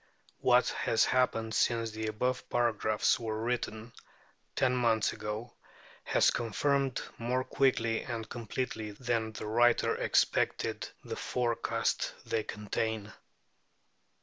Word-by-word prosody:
What - - +4
has 110 - +2
happened 115 -3 +1
since 115 0 +1
the 110 0 -4
above 125 +4 -1
paragraphs 110 -3 +2
were 110 -2 -3
written, 115 -1 -3 0.6
ten 130 -2 +2
months 115 -3 +2
ago, 110 +3 -5 0.5
has - - +4
confirmed 135 +3 0 0.2
more 125 +2 0
quickly 125 -5 +1
and 115 -3 -5
completely 110 -2 -4
than 115 -1 -1
the 110 - -6
writer 120 +2 +3
expected - - +1
the - - -5
forecasts 120 -2 -1
they 115 - 0
contain. 105 0 -3
115 Hz, 110 wpm, -31 LUFS, 110-125 Hz, 0.6 s, What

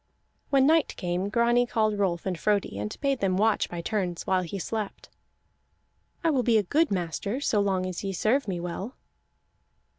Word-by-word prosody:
When 270 -1 +4
night 320 +1 +3
came 180 +1 -2
Grani 235 +3 +3
called 215 -3 +1
Rolf 175 -4 0
and 190 -2 -1
Frodi, 200 - 0
and 105 +1 -4
bade 275 -2 +1
them 185 -2 +1
watch 215 +2 +2
by 175 -1 -5
turns 180 -3 -2
while 185 -1 +2
he 180 +2 -5
slept. 210 +2 -5 1.1
"I 330 - +3
will 270 -4 +2
be 235 -2 +3
a 210 - +2
good 310 - +2
master 190 +6 -2
so 225 -7 +1
long 190 -2 +1
as 185 0 -4
ye 195 - -2
serve 220 +7 +1
me 180 -3 -2
well." 180 +7 -5
200 Hz, 180 wpm, -27 LUFS, 180-235 Hz, 1.1 s, When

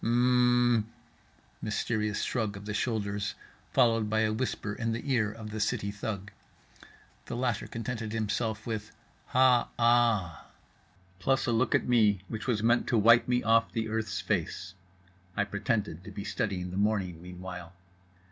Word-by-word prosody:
—"H - - -1
mmm" 120 -1 +4 0.8
mysterious 110 -1 -1
shrug 110 -5 -1
of 100 - -10
the 105 - -3
shoulders 105 -3 -1 0.4
followed 115 -3 +3
by 110 +1 +2
a 110 -1 +2
whisper 110 -3 -2
in 115 0 -2
the 125 +5 -3
ear 110 -4 +2
of 110 -1 -8
the 110 - -4
city 100 -1 0
thug. 100 0 -5 1.0
The - - -4
latter 120 -3 -1
contented 115 -1 -4
himself 110 0 -2
with 110 -2 -4 0.4
"Ha 125 -1 +4
aaa"—plus 115 - 0
a 120 - +1
look 115 +2 +2
at - - +1
me 105 -6 +4
which 110 +1 -5
was 110 -4 0
meant 120 +1 +3
to 120 - +2
wipe 115 +2 +6
me 125 0 +1
off 115 0 +3
the 110 -1 -2
earth's 110 0 -2
face 90 - -2 0.6
(I 105 - +3
pretended 100 -4 -2
to 105 - -9
be 100 0 -6
studying 95 -4 -2
the 90 - -4
morning 100 -5 0
meanwhile). 90 -1 -8
110 Hz, 155 wpm, -29 LUFS, 100-120 Hz, 1.0 s, wipe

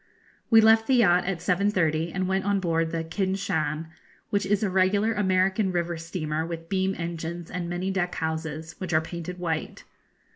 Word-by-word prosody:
We 225 -1 +7
left 220 0 +5
the 265 - +4
yacht 180 -7 +4
at 180 -3 -2
7.30, 175 -4 +1
and 185 +1 -1
went 190 0 0
on 200 -1 +1
board 165 -3 0
the 165 0 -2
'Kin 190 +3 -1
Shan,' 160 -5 -2 0.4
which 200 -2 0
is 205 +1 +1
a 205 - +1
regular 200 +4 +2
American 190 0 +2
river 175 -1 -1
steamer 160 -2 -3
with 165 0 -6
beam 190 0 0
engines 170 0 -5
and 180 -2 -3
many 180 +2 -2
deck 180 -2 -1
houses, 160 0 -4
which 185 -3 -4
are 155 - +4
painted 170 +2 -6
white. 165 -3 -3
180 Hz, 180 wpm, -26 LUFS, 165-195 Hz, 0.4 s, We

